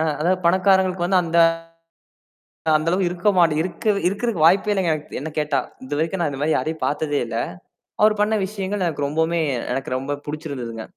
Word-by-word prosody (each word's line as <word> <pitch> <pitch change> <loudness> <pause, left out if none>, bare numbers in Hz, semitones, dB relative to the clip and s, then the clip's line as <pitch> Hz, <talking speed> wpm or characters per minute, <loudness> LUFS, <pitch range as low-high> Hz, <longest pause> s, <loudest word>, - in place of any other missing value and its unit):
அ - - +2 0.2
அதாவது 180 +3 +2
பணக்காரங்களுக்கு 185 -1 +3
வந்து 185 -1 +3
அந்த 170 +1 0 1.4
அந்த 155 +2 -1
அளவு 185 +1 +1
இருக்க 180 +3 0
மாட்ட 170 -3 +4
இருக்க 175 +1 -5 0.2
இருக்கிறக்கு 205 -2 -1
வாய்ப்பே 195 +5 +4
இல்லுங்க! 185 -5 +1 0.3
என்ன 150 +4 -5
கேட்டா! 150 -2 +1 0.3
இதுவரைக்கும் 160 +7 -2
நான் 160 - +1
இந்தமாரி 145 +3 0
யாரையும் 160 0 -2
பாத்ததே 145 0 -1
இல்ல. 115 -1 -6 0.7
அவர் 210 0 +4
பண்ண 210 +1 +2
விஷயங்கள் 200 -1 -3
எனக்கு 145 -4 -1
ரொம்பவுமே 160 +3 0 0.3
எனக்கு 135 -1 -3
ரொம்ப 140 +2 -3
புடிச்சிருந்ததுங்க. 140 -7 -5
170 Hz, 160 wpm, -22 LUFS, 150-190 Hz, 1.4 s, மாட்ட